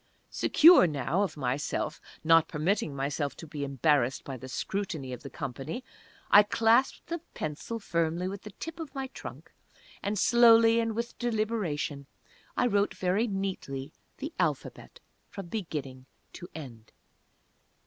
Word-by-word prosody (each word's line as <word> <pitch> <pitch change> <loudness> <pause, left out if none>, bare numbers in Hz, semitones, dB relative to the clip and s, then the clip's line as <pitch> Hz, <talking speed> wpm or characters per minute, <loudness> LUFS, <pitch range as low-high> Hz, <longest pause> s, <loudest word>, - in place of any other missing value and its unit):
Secure 330 - +7
now 150 +4 -1
of 200 -6 -2
myself, 140 +4 -2 0.2
not 165 0 +5
permitting 160 -1 -1
myself 140 +1 -2
to - - -9
be 150 -2 -5
embarrassed 135 -2 +1
by 135 - -6
the 130 +1 -9
scrutiny 155 -5 -3
of 125 - -7
the 140 - -8
company, 140 - -5 0.5
I 205 - +10
clasped 225 +4 +2
the 340 0 -4 0.2
pencil 155 +10 -4
firmly 170 -3 -1
with 195 +1 -5
the 210 - -9
tip 330 - -8
of 300 -4 -7
my 265 -1 -3
trunk, - - -9 0.5
and 205 +1 -2
slowly, 230 0 +6
and 225 -1 -1
with 235 +1 -4
deliberation, 210 - -2 0.5
I - - +3
wrote 205 -3 +1
very 190 +6 +1
neatly 185 - -4 0.2
the 295 +4 -6
Alphabet, - - -2 0.3
from 195 -5 -8
beginning 140 - -5 0.3
to 175 - -9
end. 120 -8 -10
180 Hz, 140 wpm, -29 LUFS, 145-225 Hz, 0.5 s, I